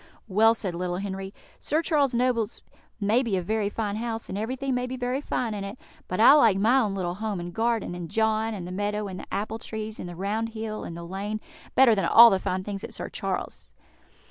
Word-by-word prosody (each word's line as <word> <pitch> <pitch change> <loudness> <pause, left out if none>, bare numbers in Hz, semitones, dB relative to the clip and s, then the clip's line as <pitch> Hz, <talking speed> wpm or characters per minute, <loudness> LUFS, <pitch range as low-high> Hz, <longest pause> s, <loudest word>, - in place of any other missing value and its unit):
"Well," 225 +3 +4
said 195 -5 -2
little 175 +1 -2
Henry, 195 0 -5 0.3
"Sir 315 +3 0
Charles 285 -6 +2
Noble's 235 -3 0 0.4
may 215 +4 +3
be 225 -7 0
a - - 0
very 215 +2 0
fine 210 -1 -3
house, 225 0 -4
and - - -4
everything 255 +6 -2
may 250 0 -1
be 260 +1 -5
very 250 +2 -1
fine 240 -5 -2
in 205 -1 -4
it, 200 +4 -6 0.3
but 185 - -3
I 235 +5 +9
like 230 -10 +5
my 230 +7 +4
own 210 -6 0
little 175 -2 -2
home 210 0 -3
and 175 0 -6
garden, 225 -2 0
and 175 -2 -6
John, 220 0 +1
and 180 -4 -6
the - - -6
meadow, 205 +2 -2
and 185 -1 -6
the - - -11
apple 210 +3 -3
trees, 220 -1 -6
and 175 - -6
the 175 - -8
round 210 +5 -2
hill, 220 -1 -4
and 170 - -7
the 170 - -7
lane, 200 +4 -4 0.4
better 260 -3 +7
than 195 - +1
all 235 0 +9
the 190 - +2
fine 185 0 -2
things 200 0 -5
at - - -6
Sir - - -5
Charles's." - - -4
215 Hz, 230 wpm, -26 LUFS, 195-230 Hz, 0.4 s, I